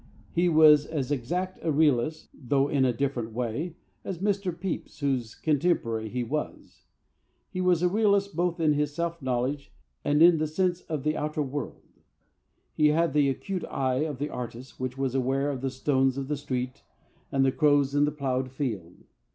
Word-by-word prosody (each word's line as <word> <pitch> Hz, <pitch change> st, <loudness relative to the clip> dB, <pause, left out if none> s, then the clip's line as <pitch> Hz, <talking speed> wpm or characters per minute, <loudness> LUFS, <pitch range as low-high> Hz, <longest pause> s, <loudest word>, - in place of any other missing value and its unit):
He 175 Hz, +1 st, +2 dB
was 155 Hz, -2 st, +6 dB
as 145 Hz, -4 st, -3 dB
exact 175 Hz, +8 st, -2 dB
a 160 Hz, -, 0 dB
realist 150 Hz, 0 st, +1 dB
(though 135 Hz, +1 st, 0 dB
in 140 Hz, -2 st, +2 dB
a 125 Hz, -, +3 dB
different 120 Hz, -2 st, -2 dB
way) 125 Hz, +8 st, -3 dB, 0.3 s
as 190 Hz, -, -4 dB
Mr. 200 Hz, 0 st, 0 dB
Pepys, 175 Hz, -2 st, -5 dB
whose 130 Hz, -6 st, -1 dB
contemporary 135 Hz, -8 st, 0 dB
he 125 Hz, +2 st, -2 dB
was. 150 Hz, +6 st, -5 dB, 0.6 s
He 185 Hz, -, -3 dB
was 180 Hz, -2 st, +3 dB
a -, -, +5 dB
realist 200 Hz, -1 st, +2 dB
both 175 Hz, 0 st, 0 dB
in 155 Hz, -2 st, +3 dB
his 145 Hz, 0 st, -1 dB
self 170 Hz, 0 st, -2 dB
knowledge 130 Hz, +2 st, -2 dB, 0.3 s
and 150 Hz, +2 st, +4 dB
in 170 Hz, -2 st, +7 dB
his 155 Hz, 0 st, -2 dB
sense 180 Hz, -1 st, +1 dB
of 155 Hz, -4 st, -2 dB
the 155 Hz, +1 st, +1 dB
outer 150 Hz, 0 st, -1 dB
world. 145 Hz, +1 st, -5 dB, 0.9 s
He 150 Hz, -, +4 dB
had 160 Hz, 0 st, +2 dB
the 145 Hz, -2 st, +3 dB
acute 185 Hz, +7 st, -3 dB
eye 130 Hz, -1 st, -1 dB
of 150 Hz, -4 st, -3 dB
the 145 Hz, +3 st, -3 dB
artist 120 Hz, 0 st, -7 dB
which 130 Hz, 0 st, -4 dB
was 135 Hz, -2 st, -1 dB
aware 135 Hz, +2 st, 0 dB
of 130 Hz, -3 st, -5 dB
the 135 Hz, -, -1 dB
stones 130 Hz, 0 st, +1 dB
of 135 Hz, 0 st, -4 dB
the 150 Hz, -, 0 dB
street 130 Hz, -3 st, -4 dB, 0.5 s
and 135 Hz, -1 st, +3 dB
the 135 Hz, -, +3 dB
crows 145 Hz, -2 st, +3 dB
in 145 Hz, 0 st, +4 dB
the 150 Hz, -, 0 dB
ploughed 130 Hz, -3 st, -2 dB
field. 110 Hz, -, -5 dB
145 Hz, 185 wpm, -27 LUFS, 130-160 Hz, 0.9 s, in